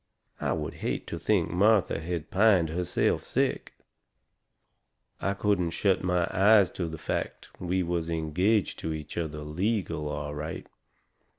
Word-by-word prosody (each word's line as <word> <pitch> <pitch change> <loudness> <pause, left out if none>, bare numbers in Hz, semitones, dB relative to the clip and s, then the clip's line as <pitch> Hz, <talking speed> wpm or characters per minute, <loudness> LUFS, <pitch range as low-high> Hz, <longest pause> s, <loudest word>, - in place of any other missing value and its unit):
I - - 0
would - - -3
hate - - -2
to 85 - -5
think 85 -1 +1
Martha 100 +2 +3
had 85 -1 -4
pined 95 -5 +4
herself 90 +2 0
sick. - - -1 1.4
I 100 0 -1
couldn't 100 -4 +1
shut 95 -2 +2
my 90 -1 +1
eyes 100 0 +5
to 85 - -3
the 80 0 -6
fact - - -4
we 90 +1 0
was 85 -1 -2
engaged 85 +6 +1
to 80 - -3
each 75 -1 -7
other 80 -3 -3
legal, 80 0 -2
all 75 0 -4
right. 75 +2 -5
85 Hz, 140 wpm, -28 LUFS, 80-100 Hz, 1.4 s, eyes